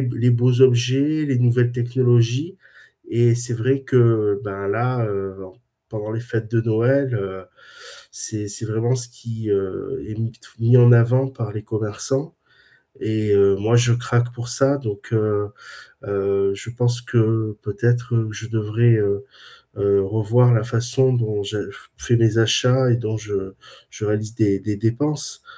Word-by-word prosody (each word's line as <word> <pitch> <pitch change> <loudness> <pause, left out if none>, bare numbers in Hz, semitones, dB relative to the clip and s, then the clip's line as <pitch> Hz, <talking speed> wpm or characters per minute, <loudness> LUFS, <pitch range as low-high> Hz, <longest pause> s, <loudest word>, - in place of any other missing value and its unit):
b 125 -1 -2
les 120 +1 +3
beaux 125 +1 +2
objets, 130 +5 +3
les 130 -3 0
nouvelles 120 0 +2
technologies 125 +6 +1 0.5
et 120 0 +3
c'est 120 0 -3
vrai 130 +4 0
que, 115 -6 +2
ben, 100 -1 -5
là, 120 +3 0
heu, 95 -1 -5
en 95 - -14 0.3
pendant 110 -1 -6
les 115 +1 -4
fêtes 115 -2 -4
de 115 -1 +2
Noël, 120 +4 +1
heu, 95 -3 -5 0.7
c'est 105 -1 -5
c'est 105 +3 -5
vraiment 110 +3 0
ce 120 -1 -5
qui, 115 -4 -7
heu, 95 -1 -3
est 110 - -7
mis 115 0 -2
de 115 - -19
f - - -13
mis 120 +2 +5
en 120 0 +7
avant 125 +3 +4
par 115 -6 -6
les 105 -1 -6
commerçants 110 +5 -3 0.7
et 110 -1 -1
heu, 100 -1 +4
moi 110 +4 0
je 120 0 +3
craque 120 0 -1
pour 120 0 -7
ça 135 +3 +2
donc, 105 -3 -7
heu, 105 -2 0 0.6
heu, 100 0 0
je 115 - -9
pense 120 0 0
que 110 -3 0
peut-être 120 +2 0
je 110 +1 -8
devrais, 115 +1 +2
heu, 100 -1 -1 0.5
heu, 100 0 +2
revoir 110 +5 +2
la 110 -2 +2
façon 125 +2 +1
dont 110 -4 -1
je 100 0 -5
f - - -16
fais 120 - 0
les 115 0 +2
achats 125 +3 +3
et - - +4
dont 110 -1 -3
je 100 -2 -5 0.4
je 105 - -6
réalise 105 +1 -2
des 105 -4 +2
des 105 0 -4
dépenses. 145 - -2
115 Hz, 170 wpm, -21 LUFS, 105-120 Hz, 0.7 s, en